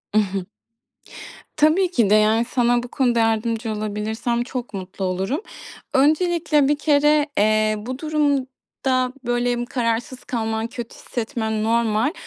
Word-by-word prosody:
I - - +5
hı. 195 -3 -2 1.1
Tabii 335 +5 +3
ki 230 - +2
de, 210 - +6
yani, 220 +2 +3
sana 240 -1 +1
bu 245 - -6
konuda 240 -2 +1
yardımcı 225 0 0
olabilirsem 215 +3 -2
çok 245 -2 -6
mutlu 190 0 -5
olurum. 190 - -1 0.5
Öncelikle, 305 0 +3
bir 290 0 +1
kere, 295 0 +3
eee, 215 +1 +3
bu 255 +5 -6
durumda, 270 -4 -1
böyle, 240 0 0
kararsız 240 +2 -2
kalman, 225 -2 -2
kötü 235 0 -8
hissetmen 220 -2 -3
normal. 230 +4 +1
240 Hz, 125 wpm, -22 LUFS, 220-270 Hz, 1.1 s, de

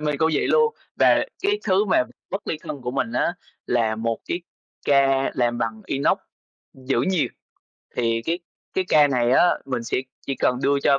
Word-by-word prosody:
mình 150 -1 -1
cũng 160 0 +3
vậy - - +1
luôn. 460 -1 +3 0.2
Và - - +5 0.2
cái 410 +1 +2
thứ 195 +1 +3
mà 185 -10 +3 0.3
bất 195 +1 -4
ly 155 - -1
thân 145 - -6
của 125 - -2
mình 140 - -2
á 175 - +1 0.3
là 110 -2 +1
một 115 0 -1
cái 175 - -2 0.4
ca 135 -1 +3
làm 120 -1 +1
bằng 110 -2 -3
inox 140 0 +1 0.6
giữ 130 -2 -1
nhiệt. 185 -5 +1 0.7
Thì 115 -1 +1
cái 170 +2 0 0.4
cái 190 - +1
ca 150 -2 +6
này 125 -2 +2
á 175 +7 +5
mình 125 -3 -3
sẽ - - -1 0.3
chỉ 135 - -1
cần 125 -1 +1
đưa 140 0 +3
cho 140 0 +4
135 Hz, 190 wpm, -23 LUFS, 120-170 Hz, 0.7 s, ca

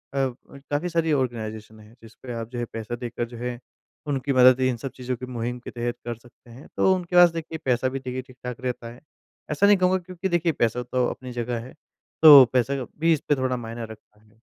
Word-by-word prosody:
काफ़ी 140 +4 -3
सारी 165 -1 0
आर्गेनाइज़ेशन 110 -5 -3
हैं, 105 +1 -17
जिसपे 115 +3 -10
आप 115 -1 -5
जो 120 - -5
है, 120 - -1
पैसा 115 +1 -4
देकर 120 -1 -4
जो 120 0 -11
है, 120 0 -4 0.5
उनकी 140 -1 -1
मदद 130 0 +6
इन 125 -2 -1
सब 130 +3 -6
चीज़ों 125 0 -3
की 125 - -7
मुहिम 125 0 -4
के 120 - -9
तहत 120 0 -3
कर 120 0 -3
सकते 120 +1 -20
हैं। 125 +5 -13
तो 190 - +4
उनके 180 -1 -5
पास, 175 0 +8
देखिए, 165 -1 -5
पैसा 130 0 +1
भी, 135 +1 -4
देखिए, 130 0 -5
ठीक-ठाक 125 -2 -9
रहता 125 -2 -4
है। 120 - -17 0.5
ऐसा 150 +7 +2
नहीं 205 0 +6
कहूँगा 185 0 +3
क्योंकि 185 +1 -5
देखिए 175 -1 +1
पैसा 120 -4 0
तो 125 +1 0
अपनी 130 -1 -6
जगह 120 0 -3
है। 120 +3 -10 0.5
तो 150 -4 +11
पैसा 130 +2 +1 0.2
भी 165 +1 +4
इसपे 150 -1 0
थोड़ा 130 -1 -1
मायने 115 0 -6
रखता 110 -1 -15
है। 110 +1 -27
125 Hz, 215 wpm, -24 LUFS, 120-140 Hz, 0.5 s, तो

